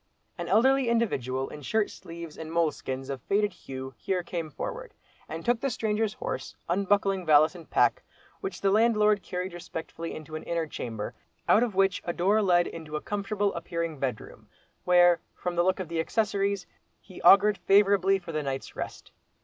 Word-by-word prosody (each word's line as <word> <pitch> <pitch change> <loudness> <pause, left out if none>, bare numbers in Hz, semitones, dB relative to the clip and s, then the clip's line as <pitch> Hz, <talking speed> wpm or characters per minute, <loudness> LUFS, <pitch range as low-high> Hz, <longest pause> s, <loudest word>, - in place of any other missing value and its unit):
An - - -5
elderly 265 +2 +4
individual 135 - 0
in 150 - -9
shirt 215 +8 0
sleeves 165 -2 -9
and 160 0 -7
moleskins 150 -5 -1
of 135 -3 -5
faded 205 - +1
hue 130 0 -8
here 185 -2 -1
came 170 -2 -4
forward, - - -6 0.3
and - - -6
took 240 -1 +2
the 275 - -1
stranger's 220 -2 -1
horse, - - -5
unbuckling 195 +1 +1
valise 155 -1 +5
and 170 -3 -12
pack, - - +3 0.4
which 390 -2 -5
the 195 - +3
landlord 210 -1 +4
carried 180 0 -4
respectfully 165 -1 -6
into 155 0 -8
an 155 - -4
inner 170 -1 -1
chamber, 115 -8 -5 0.3
out 220 - +6
of 235 -5 0
which 195 0 +2
a 175 - -2
door 200 +6 +2
led 175 -3 +4
into 160 -2 -7
a - - 0
comfortable 205 0 -1
appearing 170 -2 -4
bedroom; 130 -5 -5 0.4
where, 175 -1 +6 0.2
from 180 -1 -4
the 175 - +3
look 185 +2 +1
of 185 - -4
the 165 0 -3
accessories, 200 0 0 0.3
he 185 - -13
augured 205 +1 +6
favourably 195 -1 +4
for 175 -3 -8
the 155 -1 -1
night's 135 -2 -5
rest. - - -7
180 Hz, 175 wpm, -28 LUFS, 160-205 Hz, 0.4 s, out